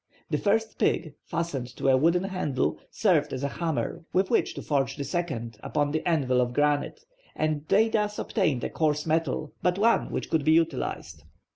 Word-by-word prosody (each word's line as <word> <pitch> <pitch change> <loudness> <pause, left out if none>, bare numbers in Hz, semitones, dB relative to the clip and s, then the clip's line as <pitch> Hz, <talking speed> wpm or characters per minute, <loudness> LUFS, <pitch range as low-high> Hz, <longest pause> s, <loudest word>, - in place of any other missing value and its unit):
The - - +1
first 220 +2 0
pig, 160 -3 +1
fastened 145 -7 -3
to - - -1
a 130 - +6
wooden 170 +7 +3
handle, 185 -9 -1
served 155 -9 +2
as 130 +1 -4
a - - +1
hammer 160 +2 -3
with 190 +1 +2
which - - +1
to - - -6
forge 135 -2 0
the 145 - -4
second 130 -8 -3
upon 145 -1 0
an 155 - 0
anvil 135 -7 +2
of 120 0 -1
granite, 145 - +1 0.3
and 155 -1 -1
they 220 +3 +4
thus 210 -2 0
obtained 155 - 0
a - - -1
coarse 150 -2 0
metal, 160 -1 -1
but 180 0 +1
one 230 +3 +3
which - - -4
could 160 -3 +2
be 155 - +4
utilized. 165 -4 -1
155 Hz, 185 wpm, -27 LUFS, 140-180 Hz, 0.3 s, a